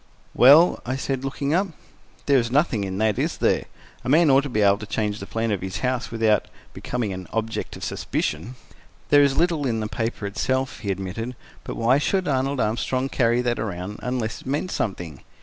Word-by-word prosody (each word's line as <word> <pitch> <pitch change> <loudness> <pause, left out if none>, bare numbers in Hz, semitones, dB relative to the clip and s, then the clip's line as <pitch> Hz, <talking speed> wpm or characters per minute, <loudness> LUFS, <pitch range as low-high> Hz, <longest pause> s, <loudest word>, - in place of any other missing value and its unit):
"Well?" 145 +8 +7
I 130 +2 -2
said, 135 0 -3
looking 140 +2 -2
up. 190 +4 +2 0.6
"There 140 -2 +4
is 115 -1 -1
nothing 130 -5 +1
in 95 0 -4
that, 110 -1 +1
is - - -1
there? - - +1 0.4
A 125 - -3
man 155 +1 +5
ought 135 +1 +6
to 140 - -5
be 110 -4 0
able 100 0 +4
to 105 - -7
change 105 0 -2
the - - -7
plan 115 0 -1
of 100 - -1
his 90 -2 -4
house 125 -1 -1
without 110 -3 +2 0.3
becoming 115 -5 -3
an 95 -1 -7
object 115 -1 -3
of - - -9
suspicion." 85 +12 -3 0.5
"There 145 -1 +7
is 140 -1 +3
little 165 -4 +1
in 115 -2 0
the 110 - -2
paper 110 0 -3
itself," 130 +6 -1
he 100 - -5
admitted; 100 +6 -4 0.3
"but - - -6
why 120 +4 +3
should 190 +5 0
Arnold 135 0 0
Armstrong 130 +4 0
carry 120 -2 +2
that 120 -1 0
around, 100 -1 -4
unless 125 -3 -3
it - - -13
meant 145 +7 -1
something? 85 - -4
120 Hz, 200 wpm, -24 LUFS, 105-135 Hz, 0.6 s, Well